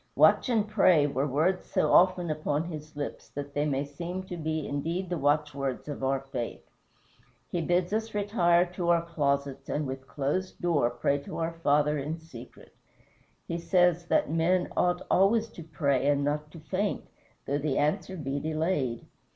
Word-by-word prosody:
"Watch - - +5
and 220 -3 +2
pray" 185 -8 +4
were 140 0 0
words 160 +7 +1
so - - 0
often 180 -2 +4
upon 150 0 -1
his 155 -2 -8
lips 145 -1 -5
that 140 0 -7
they 145 +1 0
may 140 0 0
seem 170 +6 -5
to 185 -1 -7
be 155 -2 -2
indeed 165 +6 -3
the 175 - 0
watchwords 145 -2 0
of 145 -2 -5
our 135 0 +1
faith. 130 -3 -6 0.8
He 175 - -1
bids 175 +3 +1
us 220 0 -2
retire 180 -4 +3
to 175 -1 -2
our 170 -1 +4
closets 140 -4 -1
and 150 0 -1
with 135 0 -6
closed 150 +7 -2
door 155 -9 +2
pray 140 +4 0
to 140 - -8
our 165 0 -1
Father 150 -2 +2
in 150 +4 -3
secret. 160 -8 -13 0.7
He 170 - -2
says 175 -1 +2
that - - +2
men 175 +3 +2
"ought 180 0 +1
always 220 +4 +3
to 175 - -11
pray 140 -3 0
and 145 -1 +2
not 150 +1 -1
to 165 - -12
faint," 195 +6 -2 0.4
though 140 +1 -1
the 145 -2 -1
answer 180 +5 0
be 140 -2 -3
delayed. 155 -5 -1
155 Hz, 175 wpm, -28 LUFS, 145-175 Hz, 0.8 s, Watch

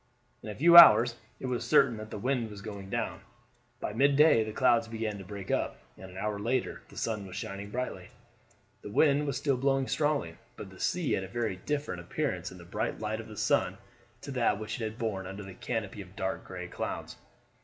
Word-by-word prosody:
In - - -8
a 105 - -5
few 170 +4 +7
hours 120 -7 +10 0.2
it - - -6
was 125 -2 -2
certain 135 -6 +4
that 110 0 -8
the - - -6
wind 125 0 -1
was 100 -1 -10
going 100 -3 -7
down. 115 +2 -3 0.6
By - - -4
midday 140 0 +5
the 110 - -5
clouds 115 -1 +3
began 110 -2 -4
to - - -8
break 100 0 -7
up, - - -1 0.2
and 95 - -11
an 90 - -11
hour 105 +1 -2
later 120 +4 -1
the - - -14
sun 105 -4 -2
was 95 - -9
shining 100 -2 -5
brightly. 105 -5 -4 0.7
The - - -8
wind 145 +6 +3
was 140 - -1
still 140 -3 +1
blowing 135 0 +1
strongly, 145 - 0 0.2
but 95 - -8
the 95 - -14
sea 175 -4 0
had 95 - +1
a - - -6
very 110 -1 -2
different 145 -5 -3
appearance 90 - -3
in 95 - -11
the 85 - -12
bright 90 - -3
light 110 0 -3
of 110 - -12
the 110 - -11
sun 95 +1 +1 0.4
to 140 - -7
that 125 -6 +1
which 110 +2 -5
it - - -1
had 110 +1 -5
borne 105 -6 -3
under 95 +2 -7
the 95 -1 -9
canopy 105 0 -4
of 95 0 -13
dark 95 0 -3
gray 90 -1 -7
clouds. - - -5
110 Hz, 220 wpm, -30 LUFS, 95-130 Hz, 0.7 s, hours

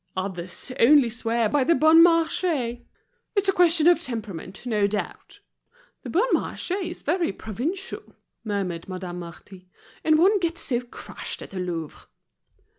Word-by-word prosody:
Others 185 +4 -4
only 265 -1 +6
swear 230 0 0
by 280 +5 +2
the 335 +6 +3
Bon 315 +1 +6
Marche. 330 0 +4 0.9
It's 400 -1 +2
a - - +5
question 345 -3 +3
of 345 0 +5
temperament, 210 - -6
no 210 -4 +1
doubt." 205 0 -6 0.6
"The - - -8
Bon 405 +9 +2
Marché 375 +2 -2
is 345 - -8
very 340 - 0
provincial," 265 - -6 0.3
murmured 195 -6 -3
Madame 180 -1 -6
Marty, 180 +2 -12 0.3
"and 310 -1 +4
one 395 +5 +4
gets 335 -1 -2
so 240 -2 0
crushed 245 - -8
at - - -12
the 190 - -5
Louvre." 170 -4 -5
240 Hz, 145 wpm, -24 LUFS, -, 0.9 s, only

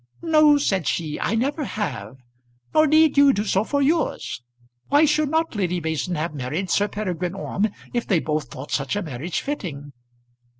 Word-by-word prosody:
"No," 305 -3 +5
said 195 - 0
she, 155 -3 -2
"I 225 - 0
never 280 +6 -1
have; 130 - -4 0.6
nor 310 0 +5
need 310 0 +4
you 280 -1 +7
do 205 - -1
so 195 -1 +1
for 280 +4 0
yours. 305 - 0 0.5
Why 290 +3 +5
should 300 -1 +1
not 320 +2 0
Lady 180 -3 0
Mason 160 +2 -2
have 160 +1 -3
married 150 +7 -3
Sir 205 - +2
Peregrine 185 -4 -3
Orme, 200 +2 -1 0.2
if 240 -1 -1
they 190 - +3
both 155 -1 -2
thought 135 +3 -9
such 135 +2 -1
a 205 - -1
marriage 155 +2 -4
fitting?" 145 - -5
200 Hz, 175 wpm, -23 LUFS, -, 0.6 s, you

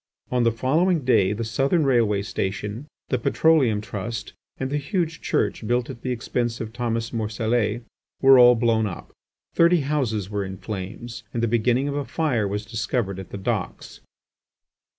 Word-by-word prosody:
On 125 -1 +2
the 115 -1 +3
following 155 - +1
day 100 -6 +4
the 110 +2 -2
Southern 140 +8 +1
Railway 115 -6 +2
Station, 105 +5 -4 0.2
the 125 - 0
Petroleum 130 -5 +3
Trust, 105 +1 -5 0.3
and 130 0 -3
the 145 - +1
huge 165 +1 -2
church 110 - -1
built 120 +1 0
at 115 - -11
the 130 - -4
expense 120 -1 -2
of 110 -1 -6
Thomas 115 -1 -2
Morcellet 110 0 -1 0.4
were 135 -1 +7
all 125 0 +8
blown 115 -2 +2
up. 85 - -8 0.4
Thirty 170 0 +4
houses 130 -9 -1
were 100 0 -2
in 95 0 -6
flames, 110 +4 -6
and 115 - 0
the - - +3
beginning 120 +4 +1
of 140 - -2
a 145 - -1
fire 125 -5 0
was 105 +2 -3
discovered 110 -3 -2
at 95 - -8
the - - -6
docks. 95 - -4
115 Hz, 170 wpm, -24 LUFS, 105-130 Hz, 0.4 s, all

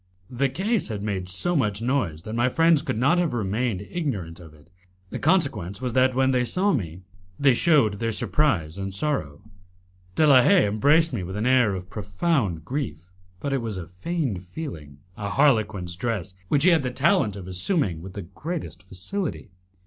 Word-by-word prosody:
The 135 +2 0
case 200 - -1
had 105 -3 -5
made 95 -4 -3
so 175 - +2
much 105 -9 +1
noise 115 - -1
that 110 - -6
my 120 +2 +2
friends 165 +1 +4
could - - -3
not 140 +9 +3
have 165 -8 0
remained 110 -1 -1
ignorant 100 - -4
of 85 -3 -13
it; 75 -1 -20 0.4
the - - -4
consequence 135 - +1
was 125 -2 -3
that, 130 0 +3
when 130 0 +3
they 125 -1 +2
saw 190 +10 +1
me, 90 - -3 0.4
they 140 -2 +5
shewed 120 - +3
their 115 -1 -1
surprise 100 - 0
and 95 0 -4
sorrow. 95 - -2 0.7
De 155 - +4
la 135 -4 +7
Haye 190 - +5
embraced 145 +11 +3
me - - -2
with 95 +2 -6
an 105 +2 -2
air 125 -6 +3
of 90 0 -8
profound 100 - -1
grief, 95 - -5 0.3
but 140 +5 -3
it 135 - 0
was 110 -4 -4
a 90 - -5
feigned 100 - -3
feeling 85 - -8 0.2
a 100 -1 -4
harlequin's 105 -9 +1
dress, 105 -2 -3
which 140 +8 +2
he 185 - +6
had 165 - +4
the 130 - -2
talent 135 - +2
of 95 -3 -8
assuming 95 - 0
with 95 +2 -9
the 100 - -6
greatest 125 - -6
facility. 100 - -5
115 Hz, 185 wpm, -24 LUFS, 95-145 Hz, 0.7 s, la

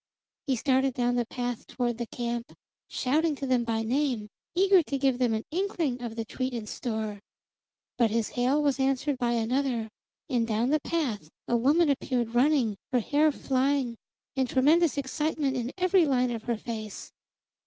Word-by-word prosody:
He 265 - +2
started 265 +1 +1
down 245 -1 +1
the 240 -2 0
path 245 -2 -4
toward 240 -2 -2
the 235 - -3
camp, 235 +1 -4 0.3
shouting 300 +4 +1
to 275 - -5
them 255 -2 +2
by 225 -1 -1
name, 245 -3 0 0.3
eager 385 0 +5
to 280 -3 -3
give 265 -2 +1
them 245 -2 +2
an 220 - -4
inkling 330 -8 -1
of 235 -2 -5
the 225 -1 -3
treat 255 +2 -3
in 225 -2 -4
store. 220 -2 -4 0.8
But 235 -2 +4
his 225 0 0
hail 260 +5 +1
was 280 -2 +1
answered 270 +1 0
by 240 -1 +1
another, 235 0 0 0.4
and 240 -6 0
down 230 +4 +1
the 305 - +3
path 265 - -2 0.2
a 240 - +1
woman 290 +8 +4
appeared 250 -4 0
running, 245 -4 +3
her 250 - +3
hair 295 +6 +3
flying, 265 -2 0 0.4
and 260 -2 0
tremendous 305 +5 +3
excitement 280 0 -1
in 245 0 -2
every 365 -2 +4
line 250 -2 +2
of 225 -2 -5
her 235 -2 0
face. 220 -2 -6
255 Hz, 175 wpm, -28 LUFS, 235-285 Hz, 0.8 s, eager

